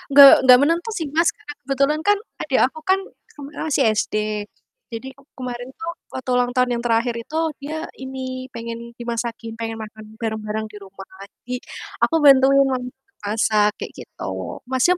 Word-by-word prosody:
Gak 280 -1 +10
gak 250 - +11
menentu 335 - +1
sih, 325 - -2
Mas, 330 +1 +4
karena 290 +1 -9
kebetulan 275 +2 +1
kan 410 +4 +3 0.2
adek 275 -4 +1
aku 265 +5 -6
kan 375 +4 +3 0.4
kemarin 285 0 -8
masih 275 -2 +3
SD. 215 - -1 0.7
Jadi 230 +3 -6
ke 275 - -21 0.2
kemarin 245 -1 -5
tuh 330 +1 -5 0.2
waktu 260 0 -6
ulang 245 0 +2
tahun 250 0 +1
yang 235 - -2
terakhir 235 +1 +2
itu 235 +7 -5 0.2
dia 315 +3 -4
ini 260 -1 -6
pengen 230 0 -7
dimasakin, 235 -1 -4
pengen 225 0 -5
makan 215 0 -10
barang-barang 220 -1 -3
di 215 - -12
rumah. 195 0 -11 0.4
Jadi 250 +1 -3 0.5
aku 325 - +3
bantuin 275 0 +7
mamah 255 -2 -2 0.3
masak 210 0 +2
kayak - - -6
gitu. - - -11 0.4
Masnya 260 +8 +2
250 Hz, 165 wpm, -22 LUFS, 230-280 Hz, 0.7 s, gak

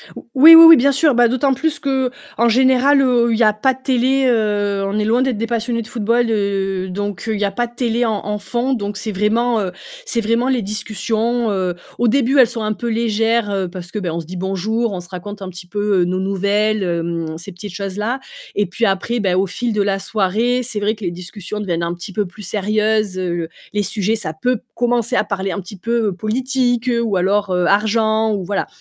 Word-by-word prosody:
Ou - - -10
oui, 315 +5 +10
oui, 330 - +11
oui, 330 -2 +10
bien 280 +3 +3
sûr. 280 +1 +3
Bah, 240 0 +5
d'autant 265 +3 +1
plus 300 +2 -2
qu'en 260 -4 -1
général, 260 +3 +4
heu, 245 -2 +3
il - - +1
y 235 - +3
a 215 -1 +4
pas 260 +5 +1
de 260 - -15
télé, 265 +1 +2
heu, 205 -4 +1
on 200 - -2
est - - +1
loin 235 +3 +2
d'être 260 -5 0
des 230 - -2
passionnés 230 0 -1
de 220 - -9
football, 235 +1 0
heu, 195 -3 -1
donc 205 +2 -4
heu, 220 - 0
il - - -4
y 205 - +1
a 200 - -1
pas 240 +4 -1
de 240 - -22
télé 240 -1 0
en 215 -3 -2
en 210 0 -2
fond, 240 +6 -2
donc 205 -3 -3
c'est 215 - -4
vraiment, 220 +4 +1
heu, 190 -2 -3 0.3
c'est 235 - -1
vraiment 230 +3 +1
les 255 -3 +1
discussions, 215 +3 -2
heu, 185 -2 -1 0.2
au 240 - +2
début, 270 +3 +2
elles 250 - +7
sont 235 -2 -4
un 215 0 -1
peu 235 - -5
légères, 225 -1 +1
heu, 190 -2 -1
parce 175 -1 -9
que, 210 - -3
ben, 180 -4 -3
on 170 - -3
se 165 - -7
dit 185 +4 -8
bonjour, 205 +5 -1
on 185 - -4
se 175 - -12
raconte 200 +3 -8
un 190 - -5
petit 180 0 -11
peu, 205 0 0
heu, - - +2
nos 185 +1 -1
nouvelles, 200 +2 0
hem, 165 -2 -3
ces 170 - -9
petites 180 +2 -9
choses-là. 210 +6 -3 0.4
Et 205 - +1
puis 205 +6 -1
après, 225 +5 0
beh, 190 -3 +1
au 190 +1 +1
fil 230 +5 -3
de 210 - +1
la 195 -1 0
soirée, 220 +5 0
c'est 230 -3 -4
vrai 210 +2 0
que 215 - -12
les 175 - -1
discussions 180 +4 -7
deviennent 170 -4 -2
un 170 - -2
petit 175 +3 -9
peu 210 - 0
plus 190 +3 -12
sérieuses, 215 -1 0
heu, 175 -2 -2 0.3
les 205 0 0
sujets, 205 +3 0
ça 170 -8 -3
peut 245 +8 -1 0.2
commencer 240 0 0
à 215 - +3
parler 195 -2 -3
un 185 - -3
petit 190 +2 -11
peu, 230 +2 0
heu, 195 - -1
politique, 245 +4 -1
heu, 235 -1 +1
ou 225 -4 -1
alors, 200 +2 +1
heu, 180 -1 +1
argent 220 +2 +2
ou 195 - -2
voilà. 200 +2 -2
215 Hz, 240 wpm, -18 LUFS, 195-235 Hz, 0.4 s, oui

